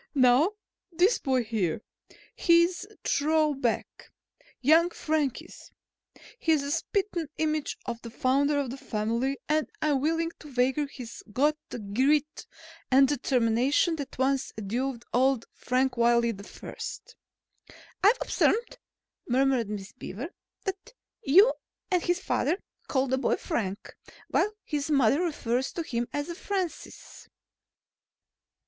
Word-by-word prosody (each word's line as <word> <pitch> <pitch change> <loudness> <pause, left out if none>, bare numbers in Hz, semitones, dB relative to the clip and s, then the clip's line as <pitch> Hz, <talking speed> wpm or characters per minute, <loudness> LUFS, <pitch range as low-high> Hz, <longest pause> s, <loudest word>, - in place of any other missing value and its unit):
"Now, 265 +8 +5 0.4
this 360 +7 +3
boy 260 -2 +1
here, 215 -5 -1 0.5
he's 340 +1 +3
a - - -19
throw 305 +1 +2
back, 250 -4 -3 0.5
young 320 +6 +5
Frank 305 -6 -1
is. - - -14 0.7
He's 320 -6 +2
the 280 - -3
spittin' 345 -1 -1
image 310 -1 -1
of 235 -1 -4
the 230 - -8
founder 275 +5 +1
of 275 -4 -1
the 265 - -6
family 235 +2 -1
and 305 -4 +1
I'm 295 -4 +1
willing 330 +2 0
to 300 - -12
wager 265 +4 +2
he's 250 -4 -9
got 295 +7 +2
the - - -5
grit 265 +8 0 0.4
and 270 +1 +6
determination 260 +4 +2
that 285 -3 -7
once 270 +1 +1
endowed 235 +4 -3
old 260 -1 +3
Frank 255 0 0
Wiley 235 0 +3
I." 200 +1 -10 1.3
"I've 425 +5 +6
observed," 470 +2 +1 0.5
murmured 255 -3 +2
Miss 205 0 -5
Beaver, 245 - -7 0.4
"that 390 +5 -5 0.3
you 400 - +6 0.4
and 360 -1 +3
his 350 +1 0
father 345 -2 0 0.3
call 265 -1 +1
the 260 0 0
boy 255 - +2
Frank, 195 -2 -4 0.3
while 420 - +2
his 295 -1 -3
mother 275 0 +4
refers 265 -7 -1
to 335 - -3
him 240 -5 -2
as 290 +4 -3
Francis." 375 -2 -5
275 Hz, 130 wpm, -28 LUFS, 245-315 Hz, 1.3 s, and